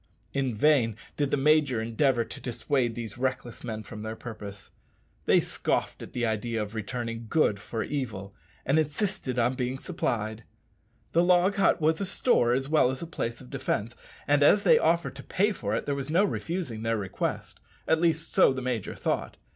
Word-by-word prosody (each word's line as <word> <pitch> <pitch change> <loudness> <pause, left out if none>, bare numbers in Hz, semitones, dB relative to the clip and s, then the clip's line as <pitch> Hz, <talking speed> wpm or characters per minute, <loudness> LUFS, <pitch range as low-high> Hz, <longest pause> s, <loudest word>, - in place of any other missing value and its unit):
In 135 -4 0
vain 115 -3 +3 0.2
did 145 -2 0
the - - +1
major 145 -3 +3
endeavour 115 +2 +1
to - - -9
dissuade 120 0 -1
these 115 -1 -6
reckless 130 -2 -3
men 110 -3 -4
from 105 +1 -9
their 110 +1 -4
purpose. 105 -4 -9 0.6
They - - +6
scoffed - - -2
at - - -9
the 120 -1 0
idea 110 +1 -1
of 105 0 -4
returning 115 +1 -4
good 105 -9 +2
for 110 +2 -4
evil, 105 -9 -4 0.3
and 140 +4 +3
insisted 155 - -1
on 120 +1 +2
being 125 0 -2
supplied. 110 -3 -3 0.7
The 170 - +4
log 180 +3 +4
hut 195 - +4
was 160 +3 +2
a - - 0
store 185 - +2
as 135 +2 0
well 150 -4 +4
as 130 +4 -4
a - - -3
place 120 -8 -4
of 60 - -13
defence, 115 +3 -2 0.3
and 145 0 +4
as 200 +8 +6
they 235 - +6
offered 165 -3 +1
to 140 - -9
pay 205 +3 +1
for 110 - -2
it - - -2
there 145 - 0
was 140 0 -4
no 175 +6 +4
refusing 165 - -3
their 115 0 0
request 95 -3 -3 0.3
at 160 0 +3
least 165 -1 +1
so - - +6
the 130 - -3
major 120 -6 -2
thought. - - -2
125 Hz, 190 wpm, -28 LUFS, 115-155 Hz, 0.7 s, They